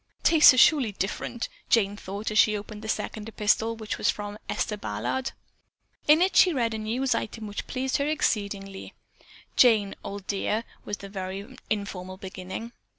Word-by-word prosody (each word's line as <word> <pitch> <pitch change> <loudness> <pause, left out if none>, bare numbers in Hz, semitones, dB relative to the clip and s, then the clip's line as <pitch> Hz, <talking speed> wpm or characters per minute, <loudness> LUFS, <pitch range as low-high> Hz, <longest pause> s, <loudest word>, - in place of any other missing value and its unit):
"Tastes 320 -3 +8
are - - -3
surely 255 -5 +5
different!" 205 +5 -3 0.2
Jane 205 -3 +3
thought 205 +2 -5
as 215 - +3
she 215 -1 +5
opened 210 +1 -8
the 220 - -7
second 215 0 -3
epistle, 220 +1 +1
which 220 -1 -5
was - - +2
from 205 0 -3
Esther 210 - -1
Ballard. 205 - -3 0.7
In 310 +4 +7
it 380 - 0
she 365 - +7
read 235 -5 0
a 220 - -3
news 245 +5 0
item 220 0 -4
which 205 -1 -5
pleased 260 0 -1
her 280 - 0
exceedingly. 200 -9 -2 0.6
"Jane, 215 -5 +5
old 200 -1 -6
dear" 210 +3 -1 0.2
was 205 - -3
the 200 - -9
very 195 +5 -6
informal 185 -3 -3
beginning. 190 +4 -7
215 Hz, 165 wpm, -27 LUFS, 200-235 Hz, 0.7 s, Tastes